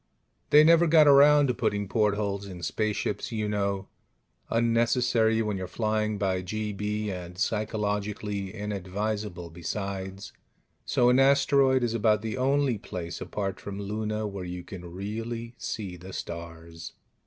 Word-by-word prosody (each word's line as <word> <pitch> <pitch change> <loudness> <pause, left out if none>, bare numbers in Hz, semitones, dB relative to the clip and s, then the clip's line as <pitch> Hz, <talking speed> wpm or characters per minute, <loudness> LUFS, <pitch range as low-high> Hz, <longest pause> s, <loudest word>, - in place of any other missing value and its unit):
They 150 +1 +8
never 165 +2 +6
got 155 -1 +6
around 145 +1 +7
to 125 - +1
putting 100 -3 -1
portholes 100 -1 0
in 90 -3 -9
spaceships, 105 +10 -2
you 110 -2 -2
know 100 -2 -1 0.6
unnecessary 115 -1 +2
when 105 -2 -2
you're 95 -1 -4
flying 110 +1 -1
by 95 -2 0
GB, 105 +2 -3
and 90 -2 -6
psychologically 105 -1 -2
inadvisable, 105 -2 -4
besides 95 +2 -5 0.5
so 120 0 +3
an 125 +1 +4
asteroid 135 -1 +4
is 115 -2 0
about 110 -1 +2
the 110 -1 -3
only 135 -2 +1
place, 85 -2 -6
apart 100 -2 -3
from 100 0 -7
Luna, 105 +1 -3
where 100 -2 -5
you 90 0 -6
can 90 -2 -9
really 115 +5 -5
see 95 -5 -5
the 95 +2 -10
stars. 85 -1 -7
105 Hz, 135 wpm, -27 LUFS, 95-115 Hz, 0.6 s, They